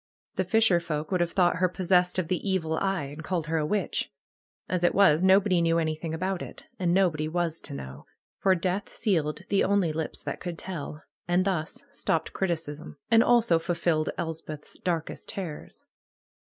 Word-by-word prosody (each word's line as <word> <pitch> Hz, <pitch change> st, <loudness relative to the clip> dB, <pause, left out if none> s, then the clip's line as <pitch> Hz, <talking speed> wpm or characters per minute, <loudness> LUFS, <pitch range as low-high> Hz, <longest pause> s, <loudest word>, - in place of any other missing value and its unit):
The 190 Hz, -, -1 dB
fisherfolk 175 Hz, -7 st, +2 dB
would 180 Hz, -2 st, +2 dB
have 175 Hz, -, +1 dB
thought 180 Hz, -2 st, +3 dB
her 185 Hz, +1 st, +2 dB
possessed 180 Hz, 0 st, +2 dB
of 185 Hz, -3 st, 0 dB
the 180 Hz, -, +1 dB
evil 165 Hz, -4 st, 0 dB
eye, 195 Hz, -5 st, 0 dB
and 145 Hz, +3 st, -8 dB
called 175 Hz, -3 st, -1 dB
her 160 Hz, 0 st, 0 dB
a 150 Hz, -, 0 dB
witch. 205 Hz, +1 st, -1 dB, 0.6 s
As 180 Hz, -1 st, -1 dB
it 175 Hz, -, +3 dB
was, 180 Hz, -5 st, +5 dB
nobody 190 Hz, -1 st, +4 dB
knew 165 Hz, 0 st, +3 dB
anything 155 Hz, 0 st, -1 dB
about 185 Hz, +3 st, -2 dB
it. -, -, -9 dB, 0.2 s
And 175 Hz, -2 st, +1 dB
nobody 175 Hz, -5 st, +2 dB
was 165 Hz, 0 st, -1 dB
to -, -, -8 dB
know. 65 Hz, -1 st, -9 dB, 0.3 s
For 190 Hz, -1 st, +4 dB
death 185 Hz, +3 st, -2 dB
sealed 160 Hz, -, -1 dB
the 200 Hz, -, +3 dB
only 190 Hz, -5 st, +2 dB
lips 160 Hz, 0 st, -4 dB
that -, -, -4 dB
could 175 Hz, -2 st, -5 dB
tell, 155 Hz, -4 st, -6 dB, 0.2 s
and 175 Hz, +1 st, +2 dB
thus 195 Hz, -, -2 dB
stopped 165 Hz, -, -1 dB
criticism, 160 Hz, -5 st, -3 dB
and 225 Hz, 0 st, +7 dB
also 235 Hz, -9 st, +4 dB
fulfilled 165 Hz, -2 st, 0 dB
Elspeth's 160 Hz, -2 st, -6 dB
darkest 165 Hz, -3 st, -3 dB
terrors. 175 Hz, -6 st, -7 dB
175 Hz, 175 wpm, -27 LUFS, 160-190 Hz, 0.6 s, and